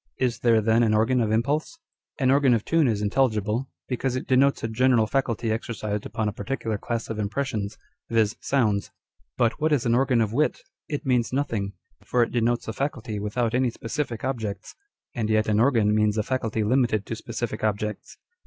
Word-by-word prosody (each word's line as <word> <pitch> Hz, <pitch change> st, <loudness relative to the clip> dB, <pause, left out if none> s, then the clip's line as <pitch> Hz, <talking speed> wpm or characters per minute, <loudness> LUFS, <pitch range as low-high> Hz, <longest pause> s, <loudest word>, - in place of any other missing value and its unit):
Is 125 Hz, -3 st, 0 dB
there 115 Hz, -2 st, +4 dB
then 110 Hz, +2 st, +3 dB
an 110 Hz, -2 st, +3 dB
organ 120 Hz, +4 st, +2 dB
of 110 Hz, -2 st, 0 dB
impulse? 140 Hz, -, 0 dB, 0.4 s
An 130 Hz, -3 st, +2 dB
organ 135 Hz, -3 st, +4 dB
of 110 Hz, -, -2 dB
tune 165 Hz, -3 st, +3 dB
is 105 Hz, -3 st, 0 dB
intelligible, 110 Hz, +1 st, 0 dB, 0.2 s
because 130 Hz, 0 st, -1 dB
it 130 Hz, -, -3 dB
denotes 135 Hz, +2 st, +3 dB
a -, -, 0 dB
general 120 Hz, 0 st, +3 dB
faculty 115 Hz, -2 st, -1 dB
exercised 110 Hz, -2 st, -3 dB
upon 110 Hz, -, -2 dB
a 105 Hz, -, -2 dB
particular 110 Hz, 0 st, -3 dB
class 115 Hz, +1 st, -3 dB
of 110 Hz, -, -4 dB
impressions, 105 Hz, -1 st, -2 dB, 0.3 s
viz., 110 Hz, -2 st, +2 dB
sounds. 110 Hz, -7 st, +1 dB, 0.5 s
But 120 Hz, +4 st, +1 dB
what 155 Hz, +1 st, +2 dB
is 140 Hz, -4 st, +2 dB
an 115 Hz, -, +2 dB
organ 125 Hz, -1 st, +3 dB
of 110 Hz, -1 st, 0 dB
wit? 150 Hz, +5 st, +1 dB, 0.3 s
It 145 Hz, 0 st, -4 dB
means 125 Hz, -3 st, +1 dB
nothing; 115 Hz, -8 st, -1 dB, 0.3 s
for 125 Hz, -1 st, +2 dB
it -, -, -3 dB
denotes 120 Hz, 0 st, 0 dB
a 110 Hz, -, -3 dB
faculty 115 Hz, -5 st, -3 dB
without 110 Hz, +3 st, -1 dB
any 125 Hz, 0 st, +2 dB
specific 120 Hz, +1 st, -4 dB
objects: 110 Hz, -7 st, -4 dB, 0.4 s
and 110 Hz, -3 st, -2 dB
yet 110 Hz, 0 st, +2 dB
an 105 Hz, 0 st, +2 dB
organ 115 Hz, -4 st, +3 dB
means 105 Hz, 0 st, +2 dB
a 110 Hz, -, +1 dB
faculty 115 Hz, -3 st, -1 dB
limited 115 Hz, -2 st, +1 dB
to 115 Hz, -, -4 dB
specific 115 Hz, -1 st, -5 dB
objects. 105 Hz, 0 st, -2 dB
115 Hz, 190 wpm, -25 LUFS, 110-130 Hz, 0.5 s, there